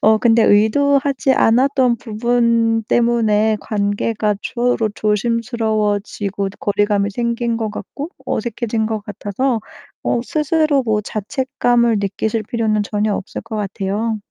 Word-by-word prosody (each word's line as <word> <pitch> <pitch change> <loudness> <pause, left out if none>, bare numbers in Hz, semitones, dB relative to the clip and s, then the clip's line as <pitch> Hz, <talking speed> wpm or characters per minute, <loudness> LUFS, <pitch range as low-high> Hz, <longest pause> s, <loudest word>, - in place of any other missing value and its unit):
어 220 0 +5
근데 230 0 +4
의도하지 275 +6 +3
않았던 255 +1 +3
부분 230 0 +1
때문에 220 -2 +2
관계가 210 0 -1
서로 240 -2 0
조심스러워지고 215 -2 -1
거리감이 205 0 +1
생긴 235 +2 -1
것 220 -2 -2
같고 280 - -7
어색해진 230 -2 -2
것 220 -1 -2
같아서 220 +4 -2 0.5
어 240 - +1
스스로 305 +1 +1
뭐 215 -2 +1
자책감을 235 +2 0
느끼실 215 +2 -2
필요는 215 -2 0
전혀 210 0 -1
없을 - - -6
것 225 -1 -6
같아요. 205 +2 -2
225 Hz, 280 characters per minute, -18 LUFS, 210-240 Hz, 0.5 s, 어